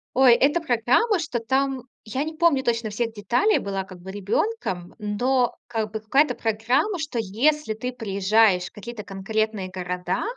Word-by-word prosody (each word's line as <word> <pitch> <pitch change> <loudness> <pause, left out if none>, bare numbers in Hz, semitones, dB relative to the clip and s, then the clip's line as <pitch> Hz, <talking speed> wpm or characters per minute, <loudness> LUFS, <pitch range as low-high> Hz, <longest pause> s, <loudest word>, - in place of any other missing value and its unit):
Ой, 260 -1 +7
это 285 +7 +3
программа, 320 - +2
что 295 -7 -2
там 265 +2 0 0.2
я 260 +6 -2
не 315 - -5
помню 315 -4 +3
точно 230 -3 0
всех 225 +2 -2
деталей, 245 - +2
была 195 -1 -3
как 185 -1 -12
бы 190 +2 -8
ребенком, 200 - -2
но 245 +4 0
как 220 -3 -2
бы 220 - -3
какая-то 270 +8 +2
программа, 235 - 0
что 300 -7 -3
если 250 +6 +1
ты 250 +4 -4
приезжаешь 200 -3 +2
в - - -8
какие-то 215 +1 -8
конкретные 200 0 -2
города, 180 -1 -3
225 Hz, 160 wpm, -24 LUFS, 205-270 Hz, 0.2 s, Ой